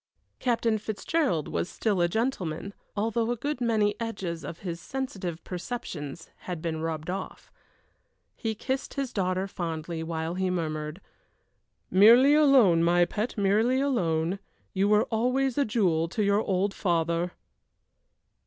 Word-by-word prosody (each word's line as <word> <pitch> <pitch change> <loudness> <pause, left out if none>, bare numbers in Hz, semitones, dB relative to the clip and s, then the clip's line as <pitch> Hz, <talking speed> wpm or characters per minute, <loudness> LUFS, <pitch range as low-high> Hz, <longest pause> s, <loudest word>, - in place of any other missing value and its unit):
Captain 230 -3 +1
Fitzgerald 215 - -1
was - - -2
still 205 -5 0
a 175 - +4
gentleman, 200 -4 -2 0.2
although 225 +2 0
a 240 - +1
good 285 +2 -3
many 215 -3 +2
edges 195 -8 -4
of 165 - -7
his 170 -3 -5
sensitive 190 -11 -4
perceptions 175 - -6 0.2
had 180 -3 -3
been 160 -1 -3
rubbed 160 -1 -3
off. 185 +2 -6 0.8
He 220 -1 -3
kissed 260 +5 -3
his 275 -3 -3
daughter 185 -1 0
fondly 165 -3 -4
while 160 0 -3
he 185 +1 0
murmured: 155 -1 -3 0.9
"Merely 235 +9 +7
a 305 0 +5
loan, 210 -12 +6
my 175 +1 +4
pet, 215 +7 -3
merely 215 +6 +3
a 280 +1 +1
loan. 170 -5 0 0.3
You 195 +1 +2
were 210 0 +4
always 250 +3 +1
a 285 - +2
jewel 180 -7 +1
to 210 +5 -1
your 200 +1 +3
old 195 0 0
father!" 170 -1 0
195 Hz, 145 wpm, -27 LUFS, 170-230 Hz, 0.9 s, Merely